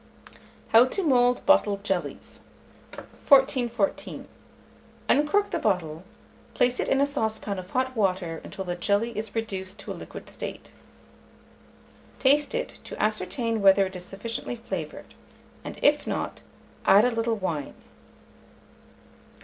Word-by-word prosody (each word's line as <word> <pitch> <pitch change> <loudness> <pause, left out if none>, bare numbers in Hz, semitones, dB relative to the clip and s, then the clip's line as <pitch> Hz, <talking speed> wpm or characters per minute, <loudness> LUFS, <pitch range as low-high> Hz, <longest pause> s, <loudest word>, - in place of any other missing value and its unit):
HOW 230 +2 +7
TO 380 +9 0
MOULD 245 -5 +3
BOTTLED 205 -9 +3
JELLIES. 190 -4 -4 0.9
1414. 265 -1 +2 0.8
Uncork 300 +9 +2
the 340 - -1
bottle; 170 - -1 0.5
place 250 0 +2
it - - 0
in 270 - +3
a 280 - +4
saucepan 220 -7 -2
of 185 0 -9
hot 260 +2 -1
water 185 -6 -1
until 190 - -7
the 175 -1 -3
jelly 205 +6 0
is 215 0 -5
reduced 195 -3 -4
to 200 - -8
a - - -2
liquid - - -10
state; - - -7 1.5
taste 290 - +3
it, - - -4
to - - -8
ascertain 220 +2 -1
whether 195 0 +6
it 190 0 -7
is 180 - -5
sufficiently 225 +6 -5
flavoured, 190 -9 -6 0.5
and - - -7
if 295 0 +3
not, - - -3 0.4
add 205 +4 +6
a 250 - +2
little 230 0 0
wine. 165 -8 -3
225 Hz, 130 wpm, -26 LUFS, 190-260 Hz, 1.5 s, HOW